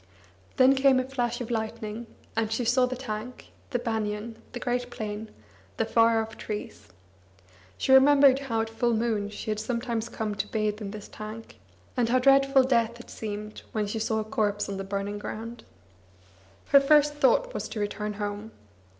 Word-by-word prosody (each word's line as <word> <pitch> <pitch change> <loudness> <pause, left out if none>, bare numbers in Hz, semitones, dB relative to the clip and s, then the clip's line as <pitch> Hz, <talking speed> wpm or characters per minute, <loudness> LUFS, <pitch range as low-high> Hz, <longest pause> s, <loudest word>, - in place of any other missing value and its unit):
Then 260 +1 +7
came 265 -1 +4
a - - +1
flash 255 -2 -2
of 240 0 -5
lightning, 220 0 -4 0.3
and 220 -1 0
she 235 +2 -1
saw 250 +2 +3
the 255 - -3
tank, 245 -1 -6 0.2
the - - 0
banian, 220 -1 -3 0.2
the 245 - -5
great 245 0 -1
plain, 215 -2 -5 0.5
the - - +1
far 230 0 +4
off 220 0 -10
trees. 210 - -6 0.9
She - - 0
remembered 275 0 +7
how 230 -5 -1
at 225 - -3
full 235 +1 +1
moon 220 -3 0
she 215 +1 -5
had 215 - -2
sometimes 235 0 -2
come 215 -2 -3
to 200 - -3
bathe 215 -1 -1
in 200 - -4
this 210 0 -8
tank, 215 +1 -9 0.4
and 240 -3 +1
how 255 - +4
dreadful 275 +1 +5
death 235 -3 +1
had 240 - -12
seemed 210 0 -6
when 215 -1 0
she 210 +2 -3
saw 220 0 0
a 220 - 0
corpse 210 -3 -1
on 200 -1 -4
the 195 - -4
burning 200 +1 -3
ground. 230 +3 -7 1.1
Her 280 - +8
first 295 +1 +5
thought - - +2
was - - -4
to 220 - -5
return 210 0 -2
home. 205 +1 -5
225 Hz, 180 wpm, -27 LUFS, 215-250 Hz, 1.1 s, Her